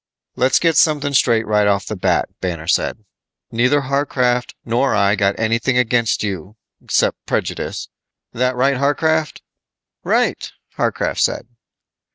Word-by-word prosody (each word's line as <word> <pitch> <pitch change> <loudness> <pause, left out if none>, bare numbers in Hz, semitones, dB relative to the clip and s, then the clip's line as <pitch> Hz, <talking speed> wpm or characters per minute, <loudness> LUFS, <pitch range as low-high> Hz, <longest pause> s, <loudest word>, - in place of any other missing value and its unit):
"Let's 130 +1 +3
get 165 -3 +2
something 145 -3 +2
straight 115 -4 +3
right 105 -1 +2
off 100 -1 +1
the 110 - -4
bat," 90 - +1
Banner 85 -4 -4
said. 105 +5 0 0.5
"Neither 125 +5 +2
Warcraft 125 -3 0
nor 120 +3 +1
I 100 0 +3
got 100 -1 0
anything 115 +3 +1
against 120 -3 +1
you 100 0 -5 0.3
'cept - - +1
prejudice. - - -3 0.5
That 125 +1 0
right, 135 +1 +1
Warcraft?" 155 +2 0 0.6
"Right," - - 0 0.2
Warcraft - - -1
said. - - 0
120 Hz, 130 wpm, -19 LUFS, 105-140 Hz, 0.6 s, Let's